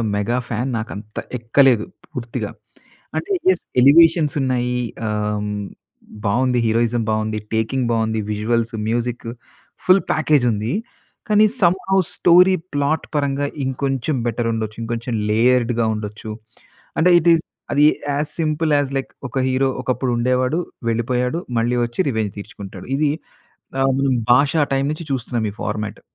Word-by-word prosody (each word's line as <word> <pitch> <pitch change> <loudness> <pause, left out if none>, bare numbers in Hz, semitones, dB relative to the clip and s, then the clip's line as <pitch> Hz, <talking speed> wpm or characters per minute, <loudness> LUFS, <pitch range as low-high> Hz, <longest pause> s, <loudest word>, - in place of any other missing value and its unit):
Mega 115 +5 0
fan 120 +3 -2
నాకు 115 +2 -5
అంత 105 +1 -11 0.2
ఎక్కలేదు 120 0 +3 0.3
పూర్తిగా. 120 -3 -4 0.7
అంటే 405 - -2 0.2
యెస్, 375 - +3 0.2
ఎలివేషన్స్ 155 +2 +6
ఉన్నాయి 125 -2 0 0.4
ఆహ్, 105 0 -1 0.8
బావుంది 125 +4 +2
హీరోయిజం 115 +1 +1
బాగుంది, 110 0 -1 0.2
టేకింగ్ 120 +3 0
బాగుంది, 110 -1 0
విజువల్‌‌సు, 115 +2 0
మ్యూజికు, 120 0 -2 0.5
ఫుల్ 185 +1 +5
ప్యాకేజ్ 155 -4 +3
ఉంది. 110 +5 -2 0.6
కానీ 210 +1 +6 0.2
సమ్‌హో 190 +2 +2 0.2
స్టోరీ 180 +2 +6 0.2
ప్లాట్ 145 +2 0
పరంగా 140 0 0 0.2
ఇంకొంచెం 135 +1 -1
బెటర్ 115 0 -1
ఉండొచ్చు, 110 -1 -3
ఇంకొంచెం 115 +1 -3 0.2
లేయర్డ్‌గా 120 +1 +3
ఉండొచ్చు 105 +1 -6 0.7
అంటే 180 +3 +5
ఇటీస్ 165 -1 +3 0.3
అది 145 +1 +5 0.3
యాజ్ 150 +1 -1
సింపుల్ 155 0 0
యాజ్ 140 -1 -1
లైక్, 135 - -5 0.2
"ఒక 130 - -3
హీరో 130 +1 +2
ఒకప్పుడు 130 0 -1
ఉండేవాడు, 125 +5 +1 0.3
వెళ్ళిపోయాడు, 125 +6 0 0.2
మళ్ళీ 120 +2 +1
వచ్చి 120 +10 -4
రివెంజ్ 110 -4 -1
తీర్చుకుంటాడు." 100 -1 -9
ఇది 150 0 +2 0.7
ఆహ్, 135 0 +3 0.4
'భాషా' 145 +4 +4
టైమ్ 135 +1 +1
నుంచి 155 0 -7
చూస్తున్నాను 120 -3 -2
ఈ - - -17
ఫార్మాట్. 105 0 -4
125 Hz, 130 wpm, -20 LUFS, 115-145 Hz, 0.8 s, ఎలివేషన్స్